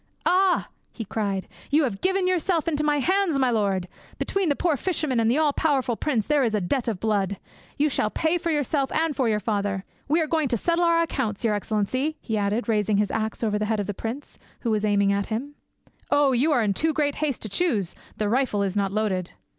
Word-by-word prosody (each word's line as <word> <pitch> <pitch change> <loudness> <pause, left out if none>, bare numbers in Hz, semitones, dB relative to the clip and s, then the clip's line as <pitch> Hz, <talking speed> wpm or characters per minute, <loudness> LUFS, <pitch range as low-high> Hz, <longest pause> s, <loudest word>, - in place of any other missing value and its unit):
"Ah!" 370 0 +3 0.2
he 225 - -6
cried, 200 -2 -2 0.2
"you 300 +2 +3
have 215 -8 -2
given 380 0 +1
yourself 350 -2 +1
into 300 -2 0
my 295 -1 +2
hands, 365 +2 +2
my 260 -2 +2
lord! 195 -5 0 0.3
Between 390 -4 0
the 285 - +2
poor 335 -1 +1
fisherman 300 -5 -1
and 225 0 +3
the 250 - +2
all 305 -2 +3
powerful 270 -7 +1
prince 240 -4 0
there 295 -2 +2
is 225 -3 +1
a - - +2
debt 240 +7 -1
of 215 -5 -1
blood. 200 -2 0 0.4
You 295 - +3
shall 250 -6 0
pay 320 +8 0
for 335 - -2
yourself 290 -2 0
and 320 -2 +1
for 255 -4 +1
your 210 -1 +1
father. 200 -2 -1 0.2
We 310 +4 +3
are 320 - +2
going 310 -1 +1
to 240 - 0
settle 340 - +1
our 335 0 +4
accounts, 250 -10 -3
your 220 - +2
excellency," 220 +9 -1
he 225 - -3
added, 210 +3 0
rising 210 -2 +1
his 205 0 +1
axe 220 +1 -2
over 210 -2 +1
the 210 - 0
head 220 0 0
of 205 - -1
the 205 - -3
prince, 230 +8 -6 0.2
who 235 - -1
was 215 -1 0
aiming 200 -1 +3
at 200 0 -1
him. 250 +7 -4 0.6
"Oh! 285 -2 +4
you 260 +5 +2
were 280 -7 +3
in 205 -2 +1
too 315 +10 +1
great 290 -2 +1
haste 295 -5 -2
to 215 - -5
choose: 210 - 0 0.2
the 210 - 0
rifle 230 -3 +1
is 195 -1 -2
not 200 -2 0
loaded." 195 -4 -1
245 Hz, 230 wpm, -25 LUFS, 210-305 Hz, 0.6 s, our